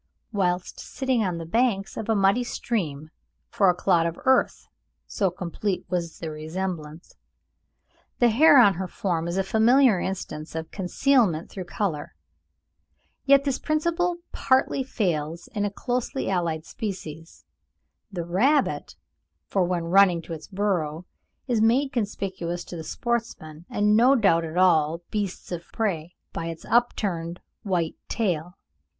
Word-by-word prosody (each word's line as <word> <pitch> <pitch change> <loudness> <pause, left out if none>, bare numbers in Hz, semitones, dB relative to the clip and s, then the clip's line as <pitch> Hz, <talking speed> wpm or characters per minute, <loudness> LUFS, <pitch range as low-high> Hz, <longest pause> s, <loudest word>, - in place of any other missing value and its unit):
whilst 180 -4 -1
sitting 260 -4 -1
on 180 -4 -1
the 165 - -6
banks 195 +1 0
of 220 - -5
a 225 - +3
muddy 200 +4 +3
stream, 160 -12 -3 0.4
for 195 -3 +4
a 180 - +3
clod 175 -2 +2
of 170 - -5
earth, 260 0 +2 0.4
so 195 -3 0
complete 180 +2 -3
was 170 -2 -2
the 160 -2 -5
resemblance. 160 0 -5 1.0
The 240 - +4
hare 285 +6 +6
on 205 -6 +7
her 185 +1 -4
form 170 -2 -2
is 170 +2 -2
a 195 - +2
familiar 225 +2 +4
instance 165 -5 -5
of 160 0 -5
concealment 195 - +1
through 185 -2 -6
colour; 170 -6 -3 1.1
yet 275 0 +6
this 275 -2 -1
principle 340 +3 0
partly 265 +1 +2
fails 170 - -2
in 205 -1 0
a - - 0
closely 245 +3 -2
allied 170 -4 -1
species, 165 -7 -7 0.7
the 175 -4 -4
rabbit, 240 - +1 0.5
for 195 - +1
when 175 -1 -1
running 175 -1 +4
to 165 - -7
its 155 -1 -8
burrow, 180 -5 -1 0.4
it 250 - 0
is 220 - +2
made 255 +5 +3
conspicuous 190 -6 -3
to - - -9
the 160 - -6
sportsman, 170 -7 -4
and 210 -3 +2
no 250 +5 +6
doubt 195 -9 +4
to 165 +1 -5
all 170 -2 +3
beasts 205 -4 -3
of 170 -1 -6
prey, 180 -7 -2 0.2
by 165 - -4
its 165 -1 -7
upturned 180 -8 0 0.2
white 175 -5 -1
tail. 180 -5 -2
190 Hz, 145 wpm, -25 LUFS, 170-225 Hz, 1.1 s, on